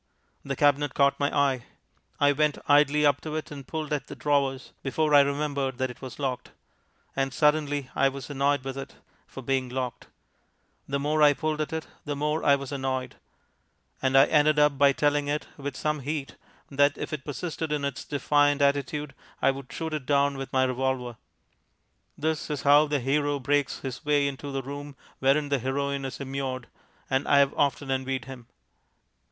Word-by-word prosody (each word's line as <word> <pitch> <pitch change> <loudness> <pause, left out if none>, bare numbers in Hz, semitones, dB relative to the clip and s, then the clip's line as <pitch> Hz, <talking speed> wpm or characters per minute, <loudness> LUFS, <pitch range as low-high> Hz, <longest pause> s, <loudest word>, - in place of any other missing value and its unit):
The 140 0 -3
cabinet 145 0 +2
caught 140 0 +3
my 145 0 +2
eye. 135 -3 +2 0.5
I 145 0 +5
went 150 +1 +1
idly 150 +1 +4
up 145 -1 +3
to 155 -1 -5
it 155 - -4
and 140 -3 -9
pulled 155 -1 -3
at 145 - -2
the 145 - -8
drawers, 140 -2 0
before 150 +3 0
I 145 - +9
remembered 140 -2 -1
that 130 -1 -1
it - - -15
was 130 -2 -8
locked. 130 -3 -3 0.6
And 135 0 0
suddenly 145 -1 +1
I 135 - +4
was 135 -2 -8
annoyed 140 -1 +1
with 135 0 -5
it 135 - -8 0.3
for 135 - -9
being 130 0 0
locked; 125 -1 -4 0.8
the 140 - -1
more 150 +2 0
I 145 -1 +7
pulled 155 0 -1
at 155 - -3
it, 160 0 -3 0.2
the 145 -1 -3
more 150 +2 -1
I 140 - +5
was 140 -1 -6
annoyed; 130 -2 -3 0.8
and 135 0 +3
I 135 - +8
ended 150 0 +3
up 150 -1 +4
by 140 0 +5
telling 145 +1 +1
it 150 +1 -1
with 140 -2 -5
some 150 0 -1
heat 140 0 -4 0.4
that, 145 +1 +3
if - - -5
it 145 -3 -4
persisted 160 +1 -4
in 145 -2 0
its 140 -2 -4
defiant 145 0 +2
attitude, 140 +1 0 0.3
I 135 - +4
would 135 -1 -9
shoot 160 -1 -4
it 145 -4 -4
down 140 -1 +3
with 135 0 -6
my 130 0 +3
revolver. 130 -2 -1 1.0
(This 160 +1 -2
is 145 -2 -3
how 145 +2 +6
the 145 -2 0
hero 145 +2 +1
breaks 140 +1 0
his 130 +2 -6
way 145 -2 +2
into 140 +1 -5
the 135 -1 -3
room 145 +1 -7 0.2
wherein 140 +2 +2
the 140 -1 +1
heroine 140 +2 -2
is 135 - -6
immured, 135 -2 -4 0.4
and 135 +1 0
I 140 - +5
have 140 0 +4
often 140 -1 0
envied 130 -1 -2
him.) 125 -3 -10
140 Hz, 190 wpm, -27 LUFS, 135-145 Hz, 1.0 s, I